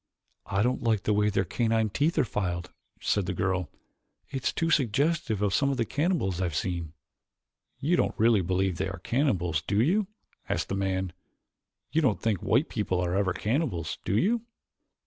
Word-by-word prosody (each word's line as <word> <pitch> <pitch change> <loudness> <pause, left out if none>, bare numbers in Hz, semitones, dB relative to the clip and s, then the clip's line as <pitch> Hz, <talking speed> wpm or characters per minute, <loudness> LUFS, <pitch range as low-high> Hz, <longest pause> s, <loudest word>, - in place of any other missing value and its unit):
"I 95 +1 +1
don't 125 +2 0
like 110 -4 +1
the 105 - +2
way 105 0 +3
their 95 -2 +1
canine 110 +2 +1
teeth 150 - +1
are 150 - +5
filed," 90 -7 -3 0.3
said 100 -3 0
the 95 - -2
girl. 90 -2 0 0.6
"It's 135 -1 -1
too 165 0 0
suggestive 135 - +1
of 100 -2 +1
some 140 - +3
of 135 - -1
the 115 - +1
cannibals 145 - 0
I - - +1
have 85 -3 -3
seen." 85 -2 -2 0.8
"You 150 +7 +1
don't - - 0
really 110 -2 +4
believe 95 0 0
they 95 - -1
are - - -6
cannibals, 90 - +1
do 100 +4 0
you?" 185 - +3 0.4
asked - - -1
the 100 - -1
man. 95 -2 -1 0.8
"You 160 - +2
don't 130 -9 +2
think 110 -5 0
white - - +2
people 90 - -1
are 90 0 0
ever 100 -1 +2
cannibals, 105 - -1
do 100 - +1
you?" 225 - +2
105 Hz, 185 wpm, -28 LUFS, 95-135 Hz, 0.8 s, are